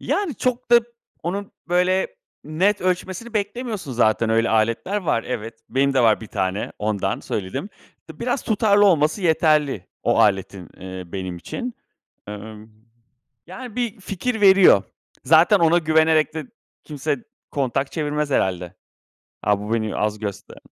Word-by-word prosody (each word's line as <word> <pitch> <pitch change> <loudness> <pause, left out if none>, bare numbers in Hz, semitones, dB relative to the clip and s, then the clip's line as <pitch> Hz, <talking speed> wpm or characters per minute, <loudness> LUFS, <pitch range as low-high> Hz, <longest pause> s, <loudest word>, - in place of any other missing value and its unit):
Yani, 390 -8 -1
çok 250 +1 -2
da, 240 0 +8 0.4
onun, 195 +4 -4 0.2
böyle, 180 +2 +1 0.3
net 185 +7 +1
ölçmesini 185 +5 -2
beklemiyorsun 210 - -3
zaten. 115 -1 +2
Öyle 115 +1 +2
aletler 115 - +1
var. 170 - 0
Evet, 115 +1 -5
benim 140 +1 +1
de 130 - +4
var 115 -3 +4
1 110 - -8
tane 95 -1 -2
ondan 100 -2 -1
söyledim. 110 - -4 0.4
D - - -11
biraz 245 +2 -1
tutarlı 205 -2 +3
olması 155 0 +2
yeterli, 150 - +2 0.2
o - - +2
aletin, 95 -3 +1
eee, 95 -1 -8
benim 95 -2 -4
için. 240 - -6 0.5
Emm, 105 +1 -9 0.8
yani, 235 +6 -9
bir 240 -5 -2
fikir 220 +5 -3
veriyor. 190 - +7 0.4
Zaten 165 - +5
ona 170 0 +4
güvenerek 160 -1 +3
de 160 - -5 0.4
kimse 145 -3 -3 0.3
kontak 135 0 -1
çevirmez 150 -2 -2
herhalde. 90 -7 -1 0.7
“A 105 0 +2
bu 105 - -6
bu 115 - +1
beni 110 -3 -2
az 105 0 -1
göster“ 105 -2 -7
150 Hz, 140 wpm, -22 LUFS, -, 0.8 s, da